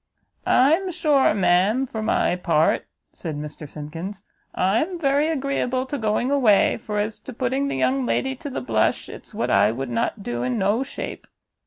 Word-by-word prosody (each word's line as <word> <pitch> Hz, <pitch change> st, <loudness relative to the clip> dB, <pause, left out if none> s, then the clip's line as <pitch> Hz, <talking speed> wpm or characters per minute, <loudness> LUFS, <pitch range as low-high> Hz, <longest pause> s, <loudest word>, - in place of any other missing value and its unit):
"I'm 320 Hz, +9 st, +4 dB
sure, 305 Hz, -6 st, +3 dB
ma'am, 200 Hz, +6 st, +3 dB
for 225 Hz, -3 st, -5 dB
my 215 Hz, -4 st, +1 dB
part," 165 Hz, -3 st, +1 dB, 0.2 s
said 160 Hz, -4 st, -6 dB
Mr 150 Hz, 0 st, -7 dB
Simkins, 165 Hz, +8 st, -7 dB, 0.3 s
"I'm 230 Hz, -, +1 dB
very 285 Hz, -1 st, +2 dB
agreeable 265 Hz, -3 st, -1 dB
to 285 Hz, +2 st, -4 dB
going 220 Hz, +4 st, 0 dB
away, 240 Hz, -8 st, +4 dB
for 215 Hz, -2 st, -5 dB
as 210 Hz, +1 st, -2 dB
to -, -, -9 dB
putting 260 Hz, +3 st, -1 dB
the -, -, -2 dB
young 130 Hz, 0 st, +1 dB
lady 265 Hz, -, 0 dB
to 285 Hz, -, -6 dB
the 255 Hz, -, -4 dB
blush, 110 Hz, -3 st, 0 dB
it's -, -, -11 dB
what -, -, -1 dB
I 105 Hz, -, +4 dB
would 130 Hz, +3 st, -4 dB
not 120 Hz, -, -1 dB
do 120 Hz, -5 st, -3 dB
in 125 Hz, 0 st, -1 dB
no 205 Hz, +5 st, +1 dB
shape." 270 Hz, -, -6 dB
215 Hz, 175 wpm, -23 LUFS, -, 0.3 s, I'm